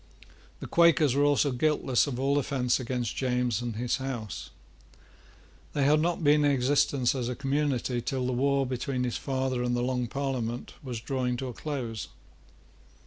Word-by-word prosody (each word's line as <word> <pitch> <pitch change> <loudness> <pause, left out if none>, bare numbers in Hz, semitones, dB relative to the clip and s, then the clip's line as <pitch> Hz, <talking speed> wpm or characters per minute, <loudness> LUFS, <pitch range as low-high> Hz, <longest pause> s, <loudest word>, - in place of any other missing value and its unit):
The - - -5
Quakers 165 -5 +4
were 140 +1 +2
also 145 0 +3
guiltless 135 -1 +2
of 125 -3 -3
all 140 +2 +2
offence 125 -3 0
against 125 -2 -3
James 125 -3 0
and 120 -2 -4
his 120 +2 -1
House. 125 - -5 1.2
They 145 - +1
had 150 +2 +4
not 170 +1 0
been 150 0 +5
in 145 - +4
existence 135 -1 +2
as 125 -3 -2
a 125 - -3
community 135 -3 -1
till 130 +1 -2
the 130 - -1
war 140 +2 +2
between 125 0 -2
his 125 -2 -1
father 130 -2 -1
and 120 0 0
the 120 - 0
Long 125 -1 -1
Parliament 125 -3 -3
was 125 -5 -5
drawing 125 -1 -1
towards 125 -2 -6
a - - -15
close. 125 -7 -4
130 Hz, 170 wpm, -28 LUFS, 125-140 Hz, 1.2 s, been